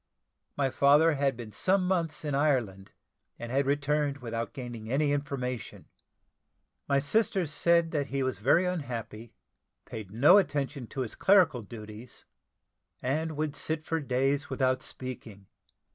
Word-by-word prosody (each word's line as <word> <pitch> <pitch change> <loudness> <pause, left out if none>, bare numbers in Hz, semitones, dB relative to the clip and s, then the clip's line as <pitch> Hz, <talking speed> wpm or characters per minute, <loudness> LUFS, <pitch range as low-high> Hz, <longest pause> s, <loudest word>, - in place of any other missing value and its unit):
My 135 -2 +1
father 150 +5 +5
had 135 -3 0
been 115 -3 -8
some 185 - +1
months 170 -4 -1
in 145 - -2
Ireland, 125 -10 0 0.5
and 120 0 -7
had 135 +1 +1
returned 145 0 0
without 115 -3 -4
gaining 120 -5 -7
any 145 +3 +1
information. 135 -4 -4 1.0
My 140 - +3
sister 190 +5 +1
said 170 +2 +2
that 145 -3 -1
he 135 0 -2
was 130 -6 -2
very 145 +11 +3
unhappy, 120 -10 -5 0.5
paid 110 -4 -8
no 145 - +6
attention 145 - -2
to 135 - -5
his 120 - -4
clerical 180 -10 +4
duties, 110 +1 -10 0.8
and 155 +4 -1
would 150 -1 -2
sit 155 0 -2
for 165 - -1
days 140 +2 0
without 130 -1 +1
speaking. 115 -6 -8
140 Hz, 140 wpm, -29 LUFS, 120-155 Hz, 1.0 s, no